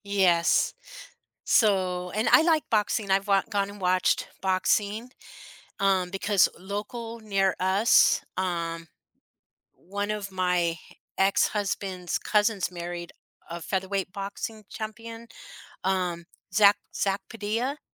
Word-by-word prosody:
Yes. 185 -4 +3 0.7
So, 185 -4 +2
and 215 +2 0
I - - +8
like 320 -2 +3
boxing, 210 -1 +1
I've 195 +1 +2
wa 195 -1 +4
gone 200 -1 0
and 205 0 -11
watched 185 0 +2
boxing, 205 +4 0 0.7
um, 190 -2 +2
because 195 +1 +2
local 225 +4 -6
near 195 -3 +1
us, 190 +5 +4
um, 170 -3 -2 0.9
one 205 +3 -4
of 205 -2 -4
my 180 -2 +1 0.4
ex-husband's 195 -2 0
cousins 210 -3 +1
married 175 0 -6 0.4
a 170 +1 -6
featherweight 190 +1 -2
boxing 205 +2 -6
champion, 225 +1 -7 0.6
um, 180 -3 -1 0.3
Zack 205 -1 +6 0.2
Zack 195 0 0
Padilla 230 +6 -2
195 Hz, 105 wpm, -26 LUFS, 185-210 Hz, 0.9 s, I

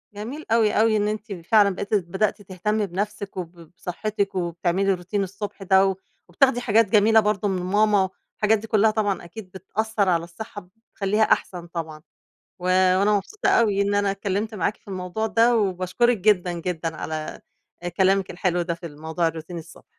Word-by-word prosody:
جميل 250 +9 -6
أوي، 225 -2 +4
أوي 220 0 +3
إن 205 0 +1
أنتِ 215 0 -4
فعلًا 210 -1 +5
بقيتِ 200 +2 -5
بدأتِ 195 +3 -1
تهتمي 205 +2 -2
بنفسِك 200 +1 -4
وب 175 -2 -5 0.3
بصحتِك 200 +2 -3
وبتعملي 175 +2 0
روتين 185 +3 -2
الصبح 195 +1 -6
ده، 190 +1 +5
و 190 - 0 0.3
وبتاخدي 245 +6 +3
حاجات 225 -1 +4
جميلة 220 +2 +5
برضه 210 -1 0
من 185 -2 -1
ماما، 205 0 +3 0.3
الحاجات 215 +1 +3
دي 225 - -9
كلّها 220 0 +3
طبعًا 205 -4 -1
أكيد 185 +1 -10
بتأثّر 200 +2 -1
على 170 -1 +2
الصحة، 205 +4 -8
ب 180 - -23 0.2
بتخلّيها 210 +2 +1
أحسن 175 -4 0
طبعًا. 160 -3 -6 0.6
و - - -13
وأنا 185 +3 +4
مبسوطة 395 - -2
أوي 210 - +3
إن 200 0 +1
أنا 200 -1 +2
اتكلِّمت 200 +2 -3
معاكِ 195 +3 -1
في - - -36
الموضوع 190 +3 -3
ده، 230 +2 +3
وباشكرِك 200 +4 +1
جدًا، 185 -3 +2
جدًا 165 -2 -3
على 155 -1 -5 0.4
آآ، 175 - -2
كلامِك 190 +2 +2
الحلو 175 -1 0
ده 170 0 -2
في 170 +1 -10
الموضوع 160 +2 -2
الروتين 165 +2 -6
الصبح. 165 +1 -14
195 Hz, 175 wpm, -24 LUFS, 180-215 Hz, 0.6 s, فعلًا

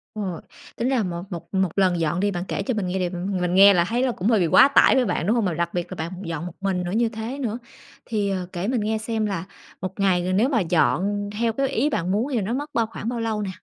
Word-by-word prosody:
Ờ, 190 -6 -4 0.3
tính 240 +3 -1
ra 250 -5 +1
một 175 -1 -4
một 170 0 -8
một 190 -2 +2
lần 185 -3 +2
dọn 165 +2 0
đi, 205 +1 +1
bạn 175 -1 -3
kể 200 - -2
cho 250 - -1
mình 205 -4 -2
nghe 180 -1 -1
đ - - -11 0.3
mình 180 0 0
nghe 200 +1 +8
là 170 -1 +3
thấy 240 +3 0
là 255 - +2
cũng 195 -1 -3
hơi 225 -4 +4
bị 170 - +2
quá 265 - +7
tải 280 - +5
với 255 -2 +3
bạn, 185 - -1
đúng 225 - +3
hông? 225 -4 +1
Mà 175 - 0
đặc 170 +1 -2
biệt 175 -1 -3
là - - -4
bạn 165 +3 -4
dọn 165 0 -4
một 175 - -7
mình 190 -2 -1
nữa, 175 - -4
như 230 +2 +1
thế 230 +5 -6
nữa. 235 -3 -2 0.5
Thì, 205 -3 -1
ờ, 185 -2 -2
kể 180 +4 -3
mình 245 -3 0
nghe 220 +1 0
xem 220 0 -2
là 190 -4 -3 0.4
một 190 +2 -5
ngày 185 -3 +3
g - - -3
nếu 235 +7 +3
mà 240 -6 +2
dọn 185 +5 +1
theo 230 -1 +1
cái 275 +3 0
ý 275 +6 0
bạn 180 - -1
muốn 220 +7 +1
thì - - -1
là 220 - +1
nó 210 +5 -2
mất 290 +4 -3
bao 230 -2 +1
khoảng 225 0 -5
bao 240 -1 -3
lâu 220 -2 -1
nè? 195 - -3
200 Hz, 300 wpm, -23 LUFS, 180-230 Hz, 0.5 s, nghe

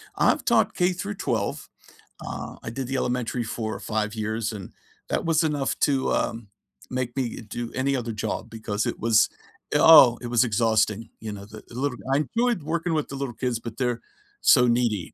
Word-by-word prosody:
I've - - +2
taught - - +3
K 180 0 +2
through 200 +3 -5
12. 110 - -2 0.6
Uh, - - -6
I - - -4
did 130 +2 -4
the 135 0 -1
elementary 125 -1 -1
for 110 -1 -4
5 105 0 -2
years 110 +1 -2
and 100 -3 -8 0.4
that - - -1
was 165 0 +3
enough 145 -3 0
to, 135 -3 +2
um, 115 -2 -1 0.4
make 125 0 -3
me 125 -3 -2
do 115 +2 -6
any 135 +1 0
other 120 -2 -3
job 110 +1 -3
because 110 -1 -3
it - - -2
was, 110 -1 +4 0.5
uh, - - +5
oh, 125 -7 +9
it 120 - -5
was 120 +1 +3
exhausting. 110 -1 +1
You 110 -2 -6
know, 100 0 -8
the 110 0 -12
the 120 - -13
little 135 -1 -1 0.2
I 145 +2 +3
enjoyed 235 - 0
working 165 +2 -1
with 155 -2 -1
the 140 - -6
little 135 -3 -4
kids, 120 0 -2
but 115 -1 -8
they're 125 -3 0 0.4
so 125 -3 +6
needy. 115 -7 0
120 Hz, 195 wpm, -25 LUFS, 110-135 Hz, 0.6 s, oh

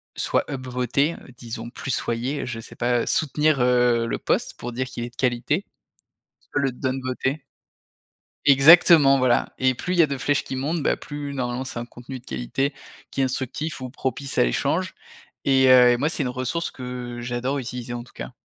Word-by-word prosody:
soit - - 0
up 130 -2 -5
voter 125 +6 0 0.2
disons, 115 -1 -7
soutenir, 125 +2 -2
je 115 -2 -5
sais - - -11
pas, 120 0 +1
soutenir, 150 -1 +1
heu, 125 -1 +3
le - - -2
post - - -1
pour 120 - -6
dire 130 +2 -3
qu'il 120 -2 -6
est 120 - -5
de 120 - -27
qualité, 130 +9 0 0.8
soit - - -3
le 135 -2 +1
down 130 +1 -2
voter. 130 +3 -2 1.0
Exactement, 140 0 +7
voilà 125 -2 +2
et 130 -1 +2
plus 180 - -3
il 175 - 0
y - - +10
a - - +2
de 140 -1 -3
flèches 145 +2 0
qui 130 - -5
montent, 150 +5 -1
bah, - - +1
plus 145 -2 -6
normalement 125 0 -2
c'est 130 - -7
un 120 - -4
contenu 125 +2 -9
de 125 - -23
qualité 65 - -2 0.4
qui 135 - -1
est - - +4
instructif 135 +4 -3
ou 130 - -5
propice 135 0 -3
à - - +6
l'échange - - 0 0.5
et 135 -1 +4
heu, 125 -1 +7
moi, 145 +4 0
c'est 150 - -3
une 125 - -1
ressource 130 +7 -2
que 125 -1 -6
j'adore 125 +3 -2
utiliser, 125 -1 -5
en 120 0 -5
tout 120 - -19
cas. - - -7
130 Hz, 195 wpm, -24 LUFS, 120-140 Hz, 1.0 s, y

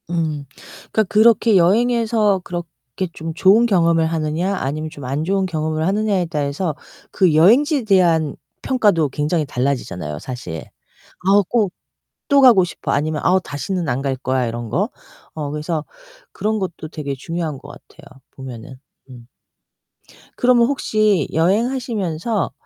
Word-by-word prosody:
음 160 -4 -2 0.5
그니까 220 - +2
그렇게 220 +1 +4
여행에서 220 +1 +2
그렇게 175 -2 -6
좀 160 0 -6
좋은 195 +7 +5
경험을 170 -6 +3
하느냐 165 +4 -1
아니면 155 -1 -3
좀 145 -4 -10
안좋은 160 +9 -1
경험을 155 -2 -2
하느냐에 200 -2 +1
따라서 150 +1 -2 0.4
그 185 -5 +3
여행지에 255 - +4
대한 170 -7 +2 0.3
평가도 205 - +2
굉장히 150 +3 -1
달라지잖아요 125 - -3
사실. 90 - -7 0.6
아우 200 +1 +5
꼭 205 -1 0 0.6
또 280 -1 +5
가고 235 -8 +7
싶어 175 - -4
아니면 150 +1 -1
아우 185 +1 +4
다시는 165 +3 -3
안갈거야 130 0 -1
이런거. 115 -1 -2 0.4
어 150 -2 -4
그래서 150 +1 -3 0.5
그런 215 +1 -2
것도 175 -4 -5
되게 150 -4 -5
중요한거 155 -1 -5
같아요. 145 - -15 0.2
보면은. 130 -1 -10 0.3
음. 120 -2 -13 1.1
그러면 245 -1 +4
혹시 215 - +1
여행하시면서 210 - 0
170 Hz, 305 characters per minute, -19 LUFS, 145-205 Hz, 1.1 s, 가고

